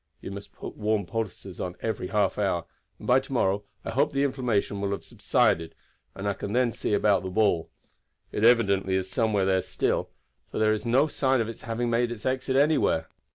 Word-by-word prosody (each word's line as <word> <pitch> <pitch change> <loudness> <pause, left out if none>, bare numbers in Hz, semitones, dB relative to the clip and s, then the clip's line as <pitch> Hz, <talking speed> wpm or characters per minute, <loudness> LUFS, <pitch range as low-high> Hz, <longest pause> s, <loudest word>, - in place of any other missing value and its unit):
You - - -7
must 100 0 -8
put - - -8
warm 105 -2 0
poultices 95 -2 -5
on 90 -1 -4
every 110 -5 -2
half 105 -1 +1
hour, 90 -5 0 0.3
and - - -11
by 125 +2 +6
to 135 +1 -11
morrow 100 -5 +1 0.2
I - - -3
hope 145 +5 +2
the 140 0 +2
inflammation 120 -7 0
will 100 - 0
have 100 - -3
subsided, 80 0 +1 0.4
and 100 - -4
I 100 - +1
can 100 +1 -5
then 125 -1 +3
see 105 - -1
about 100 -2 +3
the 95 - -4
ball. 95 -4 +1 0.6
It 105 - -2
evidently 100 -5 +4
is 95 0 -2
somewhere 110 -5 +1
there 95 -1 +2
still, - - -1 0.4
for - - -6
there 110 0 +3
is 110 +2 -3
no 130 +5 +4
sign 135 -3 +1
of 115 - 0
its 115 - -8
having 120 0 -2
made 120 +1 +1
its 115 -3 -7
exit 130 0 0
anywhere. 140 - +3
110 Hz, 205 wpm, -27 LUFS, 100-120 Hz, 0.6 s, by